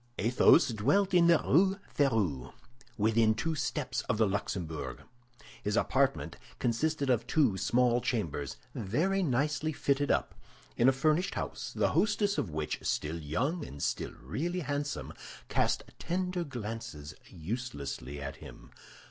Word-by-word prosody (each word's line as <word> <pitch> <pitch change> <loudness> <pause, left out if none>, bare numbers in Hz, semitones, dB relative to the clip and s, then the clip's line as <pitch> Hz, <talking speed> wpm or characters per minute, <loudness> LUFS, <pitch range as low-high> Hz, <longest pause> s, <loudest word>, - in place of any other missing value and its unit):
Athos 120 +5 +5
dwelt 145 - +2
in 175 -1 +6
the 170 -1 +7
Rue 190 +6 +4 0.2
Férou, 105 - +1 0.5
within 110 +1 +3
two 165 +8 -1
steps 145 -3 -2
of 105 - +2
the 110 - +4
Luxembourg. 80 -8 -3 0.6
His 105 +1 -1
apartment 135 +3 +1 0.2
consisted 140 +3 0
of 115 -1 +1
two 135 -11 +3
small 120 +5 +2
chambers, 80 - -2 0.2
very 160 - 0
nicely 150 +1 0
fitted 145 -1 0
up, - - +1 0.4
in 120 +2 +5
a - - +6
furnished 155 +7 +1
house, - - -4
the - - +2
hostess 205 -1 +2
of 95 - -2
which, 75 -1 -3
still 80 +2 -2
young 130 - -1
and 70 - -7
still - - -2
really 170 - -2
handsome, 145 -1 -3 0.4
cast - - +1 0.2
tender 180 0 -1
glances 115 - -6 0.2
uselessly 80 - -5
at 70 0 -6
him. - - -12
125 Hz, 135 wpm, -31 LUFS, 95-155 Hz, 0.6 s, the